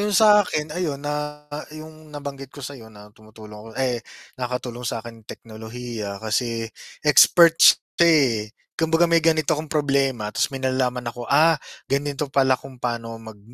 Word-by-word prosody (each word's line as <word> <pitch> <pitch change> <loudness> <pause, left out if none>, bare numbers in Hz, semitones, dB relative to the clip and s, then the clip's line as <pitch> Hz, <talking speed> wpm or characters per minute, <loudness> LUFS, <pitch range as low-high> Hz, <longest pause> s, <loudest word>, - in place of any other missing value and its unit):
yung 210 0 -1
sa 210 -1 +7
akin 150 -3 -3
ayun 155 -6 -3
na 150 0 -4 0.3
yung 155 0 -12
nabanggit 140 -2 -7
ko - - -11
sa'yo 130 -5 -9
na 105 0 -14
tumutulong 110 0 -14
ako, 105 +2 -11
ay 125 -3 0 0.4
nakatulong 125 -1 -4
sa'kin 115 -1 -6
teknolohiya 110 -2 -7
kasi 115 +1 -2 0.4
experts 165 +2 +6 0.2
'to, 170 - +5
eh. 125 -10 +3 0.2
Kumbaga 165 +1 +2
may 165 -1 +3
ganito 160 -3 +2
akong 155 0 -6
problema 135 -7 0
'tas 105 - -1
may 135 - -5
nalalaman 130 -2 -1
ako, 120 +1 -7
"Ah, 160 +3 +5 0.3
ganito 140 +1 -1
pala 135 -1 +3
kung 135 -1 -12
pa'no 115 -2 -4
mag, 110 -2 -11
130 Hz, 155 wpm, -23 LUFS, 115-150 Hz, 0.4 s, sa